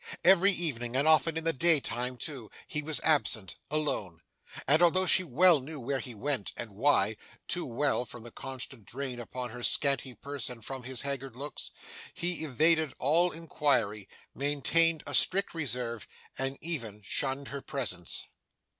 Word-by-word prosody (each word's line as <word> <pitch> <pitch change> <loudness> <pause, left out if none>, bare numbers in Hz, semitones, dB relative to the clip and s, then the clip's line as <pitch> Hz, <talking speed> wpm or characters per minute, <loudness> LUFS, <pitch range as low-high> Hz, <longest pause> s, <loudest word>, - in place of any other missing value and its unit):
Every 190 +2 +6
evening, 125 -10 -2
and 140 +3 +2
often 160 +1 +4
in 160 - -2
the 165 0 +1
day 165 +2 +4
time 125 0 -3
too, 125 -3 -5 0.2
he 150 - -3
was 150 0 0
absent, 115 - +1
alone; 110 - -2 0.4
and 150 +5 +4
although 185 +2 +4
she 185 - +5
well 170 +2 +5
knew 145 +3 -7
where 135 +2 -2
he 125 -4 -8
went, 130 -1 -2
and 115 -3 -6
why 110 -2 +2 0.3
too 175 - -1
well 130 +1 0
from 120 0 -10
the 120 - -10
constant 130 -2 -7
drain 130 -1 -5
upon 125 0 -5
her 120 +2 -8
scanty 135 0 +3
purse 140 +5 -4
and 115 -3 -10
from 135 -1 -5
his 130 -2 -3
haggard 135 -3 -3
looks 145 +3 -5 0.5
he 175 -2 0
evaded 155 +1 +2
all 165 +6 +3
inquiry, 140 -10 0 0.2
maintained 145 +4 +2
a - - -5
strict 195 +2 +3
reserve, 125 - -3 0.3
and 135 +1 -2
even 115 -11 -4
shunned 135 +6 -2
her 140 0 -5
presence. 120 - -3
140 Hz, 165 wpm, -30 LUFS, 120-155 Hz, 0.5 s, Every